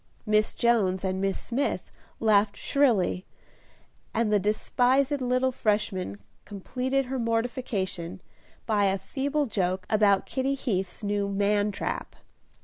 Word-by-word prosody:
Miss 215 0 +2
Jones 200 -6 +2
and 190 0 -1
Miss 195 -1 0
Smith 270 +4 -2 0.3
laughed 210 -2 +3
shrilly, 225 -10 +1 0.9
and 220 -1 +1
the 205 - +5
despised 255 +7 +1
little 255 +1 +1
Freshman 205 - -1 0.3
completed 255 +7 -2
her 260 +1 -3
mortification, 225 -6 -2 0.5
by 210 -3 +2
a 195 0 +2
feeble 280 +9 -1
joke 185 -5 -1
about 205 -3 +4
Kitty 270 +1 -1
Heath's 195 -7 -3
new 205 -1 0
man 205 +1 +1
trap. - - -4
210 Hz, 120 wpm, -27 LUFS, 195-250 Hz, 0.9 s, the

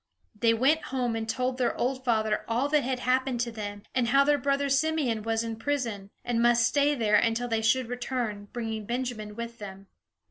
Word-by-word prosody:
They 225 +2 +2
went 280 +7 +2
home 250 -3 -1
and 225 0 -3
told 255 +2 -1
their 245 -2 0
old 260 +1 -1
father 220 -3 +1
all 240 +5 +1
that 300 0 +3
had 255 -1 -2
happened 255 0 +1
to 240 -1 -2
them, 205 -2 -6
and 250 -2 +1
how 275 +3 +5
their 290 0 +3
brother 280 +1 +1
Simeon 275 -5 +1
was 225 +1 -1
in 225 -1 -4
prison, 230 -7 -2 0.2
and 235 -1 0
must 240 0 +4
stay 290 0 +2
there 215 -4 +3
until 230 +3 +1
they 225 -2 0
should 255 +3 +2
return, 240 -4 -3
bringing 220 -3 -4
Benjamin 240 -4 -3
with 235 +1 -6
them. 195 -1 -9
240 Hz, 200 wpm, -28 LUFS, 225-260 Hz, 0.2 s, how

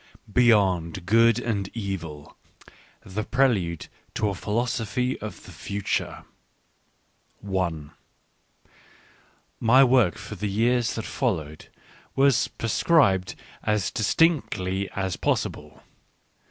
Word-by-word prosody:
"Beyond 95 -8 +3
Good 115 +3 +4
and 105 -6 -2
Evil: 85 -9 -6 0.7
The 100 +3 -4
Prelude 105 - +1
ft - - -9 0.3
to 105 - +1
a - - -2
Philosophy 120 +4 -2
of 110 0 -7
the - - -12
Future" 100 -1 -3 1.2
i 95 -2 +1 1.9
My 125 +4 +6
work 125 -9 +4
for - - -8
the 105 +2 -3
years 120 +3 +1
that 110 - -4
followed 85 - -3 0.5
was 135 -3 +3
pre 115 - -5
scribed 100 - +3 0.3
as 105 -3 0
distinctly 100 - +1
as 95 -2 -2
possible. - - -2
105 Hz, 100 wpm, -25 LUFS, 95-120 Hz, 1.9 s, My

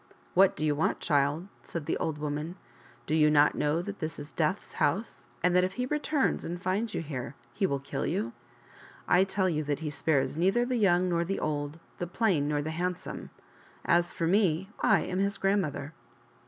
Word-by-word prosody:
" - - -31
What 190 +1 +5
do 155 - -1
you 150 - +3
want, 150 +2 0
child 145 +3 +1
?" - - -31
said 165 -3 -6
the - - 0
old 160 -2 -2
woman; 150 +3 -3 0.3
" - - -26
do - - -2
you 155 -1 +5
not 150 0 +5
know 150 +3 0
that 205 +2 -6
this 155 -2 -3
is 145 +1 -8
Death's 165 +5 -1
house, 200 - 0 0.2
and 180 0 +3
that 180 - +5
if 185 +1 -1
he 250 +3 -2
returns 300 0 0
and 175 +1 -4
finds 200 +5 -1
you - - -2
here 135 -3 -5 0.2
he 190 +9 +1
will 140 - 0
kill 140 0 -3
you? 115 +2 -1 0.7
I 180 - +5
tell 190 0 0
you 155 -3 0
that 145 +1 -1
he 155 -2 -3
spares 145 -2 +1
neither 195 +9 +2
the 250 0 0
young 185 -4 +3
nor 170 -1 +1
the 195 +3 -2
old, 145 +1 -2 0.2
the 175 - -2
plain 175 -7 +1
nor 145 -1 0
the 155 - -3
handsome. 180 +2 -4 0.6
As 175 0 +3
for 165 - -2
me, 190 -1 +2
I - - +4
am 185 0 -2
his 200 +1 0
grandmother." 160 -7 0
170 Hz, 210 wpm, -29 LUFS, 150-190 Hz, 0.7 s, What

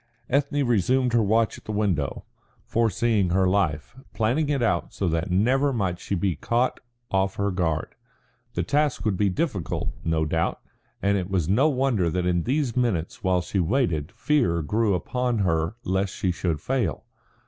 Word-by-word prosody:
Ethne 140 +1 +1
resumed 125 +3 +2
her 120 - +4
watch 110 +1 +1
at - - -29
the - - -4
window, 95 -10 -1 0.4
foreseeing 115 -3 +1
her 95 +1 +2
life, 90 -2 0 0.2
planning 130 +8 +1
it 140 -4 +1
out 90 -7 0
so 95 - -2
that 80 +2 -1
never 130 +10 +2
might 95 -8 -1
she 100 - -3
be 90 -1 0
caught 120 - 0 0.3
off 95 0 +1
her 100 0 0
guard. 80 -4 -1 0.6
The - - 0
task 145 -4 0
would 105 -3 +1
be 100 +1 +2
difficult, 100 - -2
no 80 -1 +1
doubt, 80 +2 -1 0.4
and 100 0 +2
it 90 0 -4
was 90 -5 0
no 130 +11 +4
wonder 130 - +1
that 90 +2 -1
in 90 -1 +1
these 135 -2 0
minutes 110 -10 -1
while 90 -1 +2
she 95 - -2
waited 85 - 0
fear 90 - +1
grew 105 +4 +1
upon 125 +7 -1
her 85 -2 0
lest 95 +1 -1
she 95 - 0
should 85 -3 -2
fail. 130 -4 -1
100 Hz, 170 wpm, -25 LUFS, 90-120 Hz, 0.6 s, her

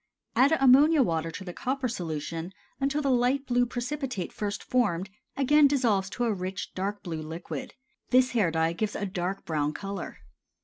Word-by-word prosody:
Add 265 +6 +5
ammonia 275 +3 +6
water 165 -5 -1
to 165 +4 -7
the 180 -2 -7
copper 260 +4 -2
solution 165 -3 -4 0.3
until 285 +2 0
the 275 - +2
light 255 +3 +2
blue 245 -1 +2
precipitate 250 - -4
first 205 -1 -3
formed 200 -7 0 0.3
again 290 +2 +5
dissolves 230 -9 +1
to 245 - -3
a 230 -2 +2
rich, 185 0 -5
dark 200 +2 -3
blue 165 -3 -4
liquid. 160 -1 -6 0.3
This 255 0 +4
hair 215 -8 +2
dye 160 0 +1
gives 210 +4 -2
a 205 - -2
dark 190 0 -3
brown 150 -2 -1
color. 195 +1 -6
205 Hz, 170 wpm, -28 LUFS, 175-255 Hz, 0.3 s, ammonia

